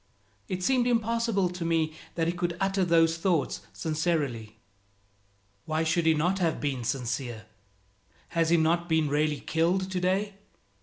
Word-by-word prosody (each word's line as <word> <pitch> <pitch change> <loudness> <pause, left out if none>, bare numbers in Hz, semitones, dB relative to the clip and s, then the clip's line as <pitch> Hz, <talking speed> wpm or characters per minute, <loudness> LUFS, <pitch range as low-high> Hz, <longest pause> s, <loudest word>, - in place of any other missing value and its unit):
It 185 -2 -3
seemed 250 +2 +2
impossible 230 -4 +1
to 180 -1 -5
me 165 -2 +1 0.2
that 165 - 0
he 170 - 0
could 175 -1 -2
utter 195 0 +1
those 165 -1 +3
thoughts 170 -4 0
sincerely. 140 - -2 1.1
Why 155 +1 0
should 165 +1 +1
he 160 - +5
not 180 +5 +1
have 165 -3 0
been 135 -4 -2
sincere? 120 -3 -3 0.8
Has 165 -1 +1
he 170 - +5
not 170 +2 +1
been 160 -2 +2
really 150 0 0
killed 180 +4 0
today? 190 +3 0
165 Hz, 145 wpm, -28 LUFS, 155-185 Hz, 1.1 s, he